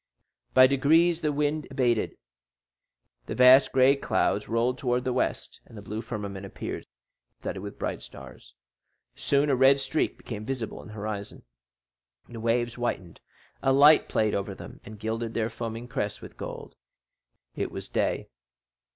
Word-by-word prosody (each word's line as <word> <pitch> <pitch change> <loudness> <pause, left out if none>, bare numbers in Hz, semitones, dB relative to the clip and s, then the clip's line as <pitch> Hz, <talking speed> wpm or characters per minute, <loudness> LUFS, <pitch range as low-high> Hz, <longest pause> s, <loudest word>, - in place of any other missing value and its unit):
By 130 0 +9
degrees 160 +6 +3
the 150 - +1
wind 150 +1 -1
abated, 125 -4 0 1.1
vast 130 +2 +6
gray 130 +1 +5
clouds 105 -6 0
rolled 120 +3 0
towards 125 -1 0
the 130 - 0
west, - - -2
and 115 - -13
the - - -8
blue 105 +2 -5
firmament 100 -4 -6
appeared 100 - -6 0.5
studded 95 - -5
with 100 0 -8
bright - - -3
stars. - - -13 0.6
Soon 140 +1 +1
a - - +3
red 135 +2 +5
streak 135 +3 -1
became 105 -3 -7
visible 120 -1 -4
in - - -13
the 105 - -11
horizon, 105 -1 -6 0.8
the 115 - -9
waves 115 +1 0
whitened, 95 -9 -4 0.4
a 135 - +2
light 145 +3 +6
played 110 -1 +1
over 100 - -2
them, - - -11
and 110 - -10
gilded 115 +1 -3
their 115 -1 -1
foaming 115 +1 -5
crests 105 -4 -3
with - - -12
gold. - - -8 0.8
It - - -2
was - - -7
day. - - -1
120 Hz, 150 wpm, -27 LUFS, 110-135 Hz, 1.1 s, By